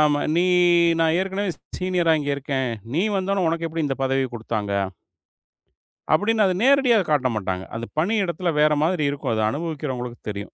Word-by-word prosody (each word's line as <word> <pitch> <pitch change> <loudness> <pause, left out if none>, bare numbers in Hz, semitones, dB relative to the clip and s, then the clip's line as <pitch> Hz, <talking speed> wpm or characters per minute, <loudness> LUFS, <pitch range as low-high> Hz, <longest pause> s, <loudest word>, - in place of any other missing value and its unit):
ஆமா. 145 -1 +3 0.2
"நீ, 175 - +3 0.6
நான் 165 0 +3
ஏற்கனவே 195 +1 -2 0.3
சீனியரா 180 -3 +2
இங்க 145 - -2
இருக்கேன். 135 -2 -2 0.3
நீ 170 - +2
வந்தவுடனே 190 -1 0
உனக்கு 165 0 -1
எப்படி 160 0 -2
இந்தப் 135 -1 -3
பதவி 135 0 +1
கொடுத்தாங்க?" 110 -3 -3 1.4
அப்படின்னு 215 +6 +2
அத 185 - +2
நேரடியா 270 -3 +5
காட்டமாட்டாங்க. 110 -10 0
அந்தப் 115 +1 -6
பணியிடத்துல 180 -2 0
வேற 150 0 +4
மாதிரி 165 -1 +1
இருக்கும். 140 -4 -3
அத 110 - 0
அனுபவிக்கிறவங்களுக்கு 140 -6 -4
தெரியும். 100 -1 -4
155 Hz, 150 wpm, -23 LUFS, 130-185 Hz, 1.4 s, நேரடியா